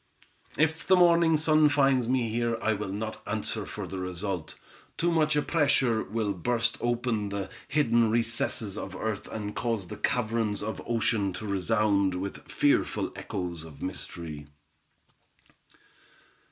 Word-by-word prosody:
"If 160 +1 +1
the 190 - +7
morning 170 -2 +5
sun 155 -1 +4
finds 135 -4 +3
me 125 -2 +2
here, 115 +1 0
I 110 -1 +1
will 100 -2 -4
not 110 +2 -4
answer - - -1
for - - -5
the 95 - -6
result; 90 -3 -3 0.4
too 175 +1 +2
much 155 -2 +2
pressure 135 -8 +2
will 105 -1 -1
burst 115 +6 0
open 120 -3 0
the 100 -1 -4 0.2
hidden 120 -6 +3
recesses 115 -2 -1
of 95 0 -6
earth, 110 0 -3
and 105 -1 -5
cause 115 -7 -2
the - - -6
caverns 115 -3 0
of 110 +1 -4
ocean 115 -4 +1
to 100 +4 -6
resound 100 -1 +1
with 95 +2 -6
fearful - - +1
echoes 85 -3 -5
of 80 -4 -11
mystery. 85 -5 -6
110 Hz, 140 wpm, -28 LUFS, 100-125 Hz, 0.4 s, the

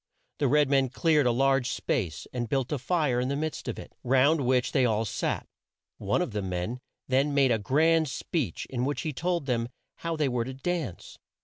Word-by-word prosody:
The 145 - +2
red 150 +2 +4
men 135 -1 +3
cleared 150 0 +2
a - - +4
large 135 +1 +2
space, 110 - -2
and 120 -2 -3
built 135 -1 0
a 150 - -1
fire 135 -2 +1
in 125 - 0
the 140 - -1
midst 155 +2 -3
of - - -3
it, - - -10
round 135 +5 +4
which 125 -1 +2
they 135 - +3
all 110 -2 +2
sat. 100 - -2 0.5
One - - +1
of - - -5
the 105 -1 -2
men 95 +6 -3 0.3
then 135 +2 +2
made 135 -3 +4
a 115 - +2
grand 160 +8 +3
speech 130 - -3
in 125 -2 -1
which 145 +2 -1
he 155 - -3
told 170 +2 -1
them 120 -3 -1 0.3
how 165 -1 -3
they 155 -2 +1
were 120 -2 -1
to 130 +1 -6
dance. 150 - -4
135 Hz, 210 wpm, -28 LUFS, 120-150 Hz, 0.5 s, red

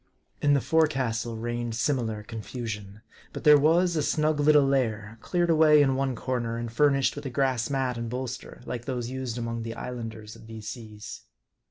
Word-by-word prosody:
In 145 0 +4
the 140 - +2
forecastle 130 -8 +1
reigned 120 0 -3
similar 115 -3 -1
confusion. 110 -2 -6 0.3
But - - -6
there 150 -2 +8
was 170 +4 +3
a 155 - +1
snug 155 +1 +1
little 145 -1 +5
lair, 115 -5 -1
cleared 175 -1 +1
away 155 -1 +6
in 135 -2 +4
one 135 -1 -1
corner, 120 -2 -2
and 120 -1 -4
fur 145 +5 +5
nished 135 -1 +1
with 145 -1 -5
a - - -3
grass 130 -3 0
mat 130 -3 -1
and 115 -1 -4
bolster, 125 +1 -6
like 120 -1 -5
those 125 -2 -3
used 130 -2 -4
among 115 -1 -3
the 115 0 -5
Islanders 115 -3 -7
of - - -14
these 110 -1 -9
seas. 110 -3 -8
125 Hz, 185 wpm, -27 LUFS, 115-140 Hz, 0.3 s, there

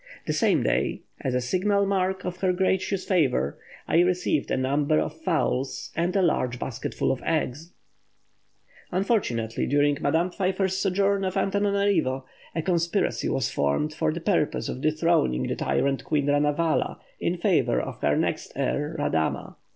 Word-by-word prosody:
The - - -1
same - - +2
day, - - 0 0.2
as 130 -3 -2
a 125 - +1
signal 200 +9 +1
mark 190 -1 0
of 180 0 -4
her 185 -1 +1
gracious 190 +1 0
favour, 130 - +1 0.3
I 165 - +3
received 180 -4 +1
a - - +1
number 140 +4 +1
of 160 +1 -2
fowls 155 -6 -1
and 175 +3 0
a 195 - +3
large 125 -7 +1
basketful 125 +1 -2
of 135 - -3
eggs." 160 0 -2 1.2
Unfortunately, 180 - 0
during 145 0 +2
Madame 170 +3 +1
Pfeiffer's 190 0 0
sojourn 195 +1 +1
at 185 -1 -1
Antananarivo, 200 -9 +1 0.3
a 165 - -1
conspiracy 170 +2 0
was 130 -4 0
formed 70 - 0
for 155 - 0
the 165 +2 -5
purpose 175 -5 0
of 130 - -5
dethroning 155 - +2
the - - -2
tyrant 135 -1 0
queen 150 -3 0
Ranavala 145 +3 +1 0.2
in - - -1
favour - - +2
of - - -6
the - - +2
next - - -1
heir, 150 +3 -1
Radama. 80 - -1
165 Hz, 150 wpm, -26 LUFS, 140-185 Hz, 1.2 s, I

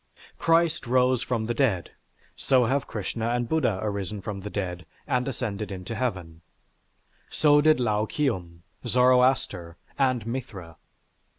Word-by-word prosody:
Christ 165 -3 +2
rose 125 0 +3
from 120 -4 -2
the 120 - -1
dead, 115 -9 0 0.4
so 130 -2 +3
have 135 +4 0
Krishna 110 +2 -3
and 120 0 0
Buddha 130 -9 +1
arisen 100 -1 -3
from 100 +1 -5
the 100 +2 -6
dead 90 -5 -4 0.2
and 125 +1 0
ascended 110 -6 -4
into 95 +3 -6
Heaven. 95 -9 -4 0.9
So 145 -1 +4
did 155 -2 +4
Lao 110 -3 +1
Kium, 90 - -2 0.2
Zoroaster, 125 -8 +2 0.2
and 130 -4 +1
Mithra. 115 -9 -6
115 Hz, 130 wpm, -26 LUFS, 100-130 Hz, 0.9 s, So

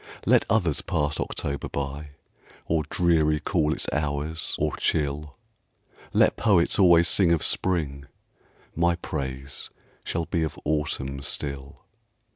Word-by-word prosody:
Let - - +4
others 90 -8 +1
pass 75 -1 -1
October 70 -1 -3
by, 70 +1 -5 0.5
Or 80 -1 +1
dreary 80 -3 +2
call 80 -1 0
its - - -1
hours, 75 +2 -1
or - - -1
chill; 75 -1 -1 0.7
Let - - +3
poets 100 -5 +3
always 85 -3 +6
sing 90 -4 +4
of 85 - +2
Spring, 70 -7 0 0.7
My 85 +1 +2
praise 70 -4 -5 0.3
shall 85 0 -2
be 85 -1 -1
of 80 - -3
Autumn 70 -3 -2
still. 70 0 -4
75 Hz, 120 wpm, -25 LUFS, 70-85 Hz, 0.7 s, always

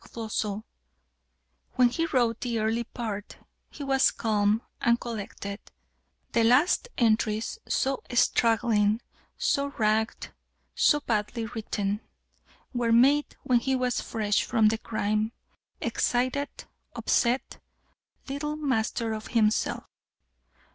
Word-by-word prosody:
Floçon. 215 -2 -3 1.1
"When 250 -1 +5
he 330 +7 -1
wrote 240 -6 +1
the 240 -2 -1
early 225 +2 0
part, 215 -4 -6 0.3
he 290 - -8
was 270 -1 +4
calm 215 0 +1 0.2
and 235 0 +3
collected; 200 -3 -6 0.7
the 230 - +3
last 255 - +4
entries, 220 -1 +1
so 270 0 0
straggling, 225 -2 +2 0.3
so 280 -1 +1
ragged, 220 +1 +1
and - - -17 0.4
so 295 -1 +3
badly 225 -1 -1
written, 210 -2 -3 0.7
were 240 -2 0
made 275 +6 +4
when 245 -2 +3
he 265 +2 0
was 250 -1 0
fresh 210 -2 0
from 220 -3 +3
the 220 0 -1
crime, 215 0 -1 0.5
excited, 255 +4 0 0.5
upset, 245 +2 0 0.7
little 290 +2 -3
master 230 -6 -1
of 215 0 -6
himself. 220 -2 +1
230 Hz, 110 wpm, -27 LUFS, 215-255 Hz, 1.1 s, When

